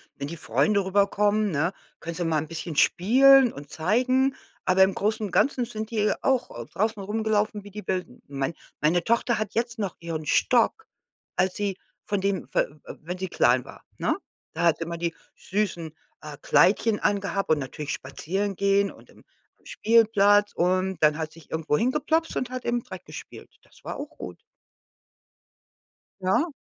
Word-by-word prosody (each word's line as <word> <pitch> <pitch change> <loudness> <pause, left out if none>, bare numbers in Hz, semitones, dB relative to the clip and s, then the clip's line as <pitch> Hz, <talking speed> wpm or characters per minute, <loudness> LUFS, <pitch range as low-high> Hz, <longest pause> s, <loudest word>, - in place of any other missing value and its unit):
wenn 140 - -5
die 165 - -6
Freunde 155 - +1
rüberkommen, 205 +2 +2
ne- 160 +3 0 0.3
können 170 - -5
sie 175 0 -2
mal 160 -2 +1
'n 155 - -5
bisschen 165 0 -6
spielen 255 - +5
und 145 0 -10
zeigen, 255 +10 +1 0.3
aber 190 +1 +5
im 190 0 +2
Großen 215 +1 -1
und 195 - -6
Ganzen 260 +2 +2
sind 220 0 -6
die 215 -2 +1
auch 260 -2 +1
au 120 0 -8
draußen 215 - -2
rumgelaufen, 210 0 -1
wie 205 - -12
die 210 +1 -9
Wilden. 180 -9 -3
Mein 140 +2 -3 0.3
meine 170 +3 +2
Tochter 235 0 +1
hat 215 -2 -3
jetzt 235 0 -2
noch 195 -4 -2
ihren 165 -2 -5
Stock, 250 - +2 0.5
als 185 0 +1
sie 200 -2 -2 0.3
von 205 -1 -1
dem 195 -1 -1
fe - - +1
w - - -8
wenn 175 +4 -5
sie 190 0 -4
klein 125 -4 +3
war, - - -14
ne? - - 0 0.4
Da - - -2
hat 170 -3 +3
sie - - -2
immer 170 +1 -5
die 170 0 -2 0.2
süßen, 175 -6 -3 0.3
äh, 150 -2 -9
Kleidchen 205 +8 +3
angehabt 200 -1 -1
und 155 - +3
natürlich 145 +2 -5
spazieren 190 +9 -3
gehen 200 0 +2
und - - -18
im - - -19 0.4
Spielplatz 205 -2 +4
und 185 +1 +1
dann 150 -1 +4
hat 155 -1 -4
sich 165 0 -16
irgendwo 160 -2 0
hingeploppst 300 - 0
und 255 - -2
hat 255 -1 -5
im 240 0 0
Dreck - - -10
gespielt. - - -10
Das - - -22
war - - -4
auch - - -6
gut. - - -8 1.8
Ja. 235 - +1
195 Hz, 175 wpm, -26 LUFS, 165-220 Hz, 1.8 s, spielen